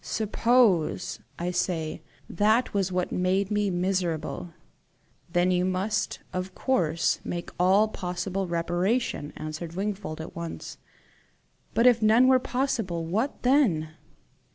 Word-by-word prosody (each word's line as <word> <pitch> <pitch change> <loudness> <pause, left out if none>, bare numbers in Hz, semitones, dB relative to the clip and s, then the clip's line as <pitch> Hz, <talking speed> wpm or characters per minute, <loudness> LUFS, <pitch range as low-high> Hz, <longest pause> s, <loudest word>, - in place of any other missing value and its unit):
SUPPOSE, 220 -4 +2 0.2
I 175 +1 -2
say, 175 -3 -2 0.3
that 215 +7 +2
was 195 -2 0
what 180 0 -1
made 190 +2 0
me 205 -1 +1
miserable!" 180 -2 -2 0.8
"Then 175 +2 +2
you 180 0 +2
must 185 +3 -1
of 185 +1 -4
course 170 - +1
make 175 -1 -5
all 190 +4 +5
possible 185 -1 -3
reparation," 175 +1 -1
answered 155 +2 -6
Wingfold 195 -5 -3
at 160 - -8
once. 170 -1 -7 1.0
"But 230 - +3
if 240 -2 +6
none 225 +4 +5
were 260 0 +6
possible 225 -11 -2
what 220 - -2
then?" 240 - +3
185 Hz, 120 wpm, -27 LUFS, 175-215 Hz, 1.0 s, if